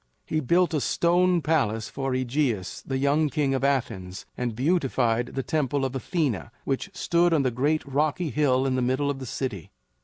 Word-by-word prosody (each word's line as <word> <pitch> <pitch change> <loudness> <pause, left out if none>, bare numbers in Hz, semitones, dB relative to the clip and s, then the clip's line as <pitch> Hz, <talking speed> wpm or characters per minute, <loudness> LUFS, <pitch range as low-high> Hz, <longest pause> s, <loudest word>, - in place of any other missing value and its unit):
He 155 - -1
built 170 +5 +2
a 150 - +1
stone 175 +1 +2
palace 115 -9 +1
for 135 -1 -3
AEgeus, 130 -6 -1
the 135 - -3
young 145 +3 +2
king 140 -2 0
of 135 - -1
Athens, 95 -9 -1
and 120 -3 -3
beautified 125 -5 +1
the 135 +1 -4
Temple 140 -2 0
of 130 0 -4
Athena 135 - -1
which 135 +8 -2
stood 175 -2 +2
on 145 - +2
the 130 - +1
great 145 +6 0
rocky 150 +3 0
hill 135 -3 +2
in 135 - +1
the 130 - 0
middle 130 +3 +1
of 135 - -6
the 130 - -7
city. 115 - -4
135 Hz, 185 wpm, -26 LUFS, 125-155 Hz, -, built